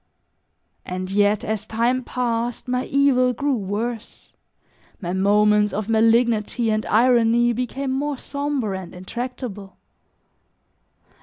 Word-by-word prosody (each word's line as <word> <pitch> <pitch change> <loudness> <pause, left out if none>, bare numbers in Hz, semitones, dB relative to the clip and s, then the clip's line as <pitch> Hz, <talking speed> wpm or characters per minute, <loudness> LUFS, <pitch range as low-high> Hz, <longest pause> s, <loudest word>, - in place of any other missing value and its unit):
And 185 +1 -5
yet 205 +1 +2
as 215 0 -3
time 240 +3 0
passed 240 -1 -2
my 250 0 -1
evil 265 -3 +3
grew 280 +4 -1
worse, 220 +2 -5 0.7
my 175 -3 -4
moments 210 +2 +3
of 210 +1 -3
malignity 225 0 +2
and 215 0 0
irony 240 0 +3
became 255 +3 -3
more 280 +1 -2
somber 280 -6 -3
and 190 -2 -7
intractable. 210 0 -6
230 Hz, 105 wpm, -22 LUFS, 210-250 Hz, 0.7 s, evil